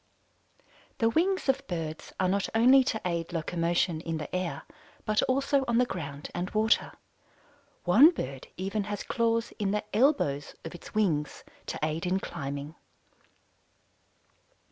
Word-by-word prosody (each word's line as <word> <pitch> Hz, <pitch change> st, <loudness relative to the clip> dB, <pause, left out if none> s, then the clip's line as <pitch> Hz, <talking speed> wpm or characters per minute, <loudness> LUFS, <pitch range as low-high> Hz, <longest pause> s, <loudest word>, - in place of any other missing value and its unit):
The 225 Hz, -1 st, +2 dB
wings 370 Hz, +6 st, +1 dB
of 270 Hz, +1 st, +1 dB
birds 160 Hz, -3 st, -5 dB
are 185 Hz, -, +2 dB
not 195 Hz, +1 st, 0 dB
only 255 Hz, +4 st, +7 dB
to 220 Hz, -, -1 dB
aid 170 Hz, -1 st, -2 dB
locomotion 170 Hz, 0 st, 0 dB
in 165 Hz, -1 st, -3 dB
the 155 Hz, +3 st, -5 dB
air, 180 Hz, -2 st, -2 dB, 0.4 s
but 215 Hz, 0 st, +2 dB
also 275 Hz, +1 st, +2 dB
on 235 Hz, -1 st, +2 dB
the 250 Hz, -, +4 dB
ground 145 Hz, -9 st, -6 dB
and 175 Hz, +2 st, -3 dB
water. 220 Hz, +2 st, +2 dB, 0.9 s
One 230 Hz, -, +8 dB
bird 135 Hz, -, -5 dB
even 195 Hz, +3 st, -2 dB
has 205 Hz, -1 st, -4 dB
claws 230 Hz, 0 st, 0 dB
in 205 Hz, -2 st, 0 dB
the 210 Hz, +1 st, 0 dB
"elbows" 215 Hz, -, +2 dB
of 165 Hz, -, -6 dB
its 175 Hz, -, -12 dB
wings 160 Hz, -9 st, 0 dB, 0.2 s
to -, -, -3 dB
aid 160 Hz, +3 st, -1 dB
in 185 Hz, +2 st, +1 dB
climbing. 145 Hz, -3 st, -5 dB
190 Hz, 145 wpm, -29 LUFS, 165-230 Hz, 0.9 s, One